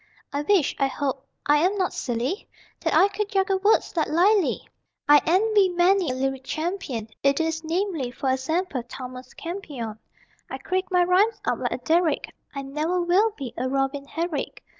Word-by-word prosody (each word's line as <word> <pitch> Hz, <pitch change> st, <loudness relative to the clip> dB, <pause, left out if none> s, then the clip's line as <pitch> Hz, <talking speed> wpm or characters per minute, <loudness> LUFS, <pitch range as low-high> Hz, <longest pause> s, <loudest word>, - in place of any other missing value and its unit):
I 285 Hz, -, 0 dB
wish 355 Hz, 0 st, +2 dB
(I 275 Hz, -, +3 dB
hope 270 Hz, -1 st, -3 dB, 0.2 s
I 295 Hz, +1 st, +5 dB
am 365 Hz, +7 st, +2 dB
not 375 Hz, -2 st, 0 dB
silly?) 245 Hz, -, -2 dB, 0.3 s
That -, -, 0 dB
I 390 Hz, -, +6 dB
could 410 Hz, +1 st, -3 dB
juggle 385 Hz, -1 st, +1 dB
words 410 Hz, 0 st, +2 dB
like 320 Hz, -, +1 dB
Lyly. 370 Hz, +4 st, +2 dB, 0.4 s
I 295 Hz, 0 st, +7 dB
envy 400 Hz, +2 st, +4 dB
many 355 Hz, 0 st, +3 dB
a 255 Hz, -, -1 dB
lyric 270 Hz, 0 st, -2 dB
champion, 310 Hz, -, -3 dB, 0.2 s
I. -, -, +4 dB
e., -, -, +3 dB
viz., 320 Hz, +2 st, -1 dB
e. 340 Hz, +5 st, 0 dB
g., 265 Hz, +2 st, -1 dB
Thomas 255 Hz, 0 st, -8 dB
Campion. 285 Hz, -, -6 dB, 0.5 s
I -, -, -4 dB
creak 375 Hz, 0 st, -2 dB
my 360 Hz, -2 st, +4 dB
rhymes 380 Hz, +6 st, +3 dB
up -, -, 0 dB
like -, -, -1 dB
a -, -, -2 dB
derrick, 330 Hz, -2 st, +1 dB, 0.2 s
I 275 Hz, -, -4 dB
ne'er 305 Hz, +6 st, -1 dB
will 365 Hz, +6 st, +3 dB
be 255 Hz, -5 st, -6 dB
a 255 Hz, +2 st, -2 dB
Robin 275 Hz, +1 st, -1 dB
Herrick. 330 Hz, 0 st, -4 dB
320 Hz, 175 wpm, -25 LUFS, 270-375 Hz, 0.5 s, I